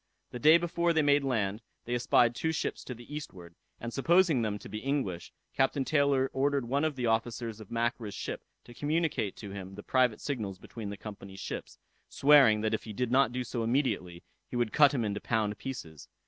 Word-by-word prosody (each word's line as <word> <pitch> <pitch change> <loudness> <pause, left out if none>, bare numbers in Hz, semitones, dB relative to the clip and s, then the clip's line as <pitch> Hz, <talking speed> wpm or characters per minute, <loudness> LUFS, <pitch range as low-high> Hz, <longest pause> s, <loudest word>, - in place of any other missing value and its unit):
The 125 - -6
day 155 +6 +7
before 170 0 0
they 160 -1 +3
made 145 0 +4
land, 110 -5 -1 0.2
they 120 - -3
espied 120 -1 +3
two 160 +6 -1
ships 160 - -3
to 125 - -6
the 120 +5 -12
eastward, 90 - -8 0.3
and 115 0 -6
supposing 165 -1 +3
them 105 -2 -1
to - - -11
be 105 - -5
English, 120 -11 -2 0.2
Captain 135 +1 +1
Taylor 140 -3 +2
ordered 140 -2 +1
one 140 +4 +1
of 155 -2 0
the 125 -2 -2
officers 115 0 -1
of 110 - -11
Mackra's 115 -3 -2
ship - - -5 0.2
to 120 - -13
communicate 150 - -1
to 100 -3 -9
him 95 -1 -8
the 105 - -9
private 125 -4 +2
signals 110 -9 -4
between 105 +2 -8
the 100 - -6
Company's 100 -2 -9
ships, - - -6 0.3
swearing 135 -7 +6
that 110 0 0
if 110 - -2
he 110 - -7
did 125 +2 -2
not 130 -2 +4
do 125 +1 -2
so 120 0 -4
immediately, 115 -8 -1 0.3
he - - -6
would 120 -3 0
cut 145 -2 +6
him 125 -6 -1
into 105 0 -3
pound 110 -2 0
pieces. 85 - -7
120 Hz, 205 wpm, -30 LUFS, 105-140 Hz, 0.3 s, day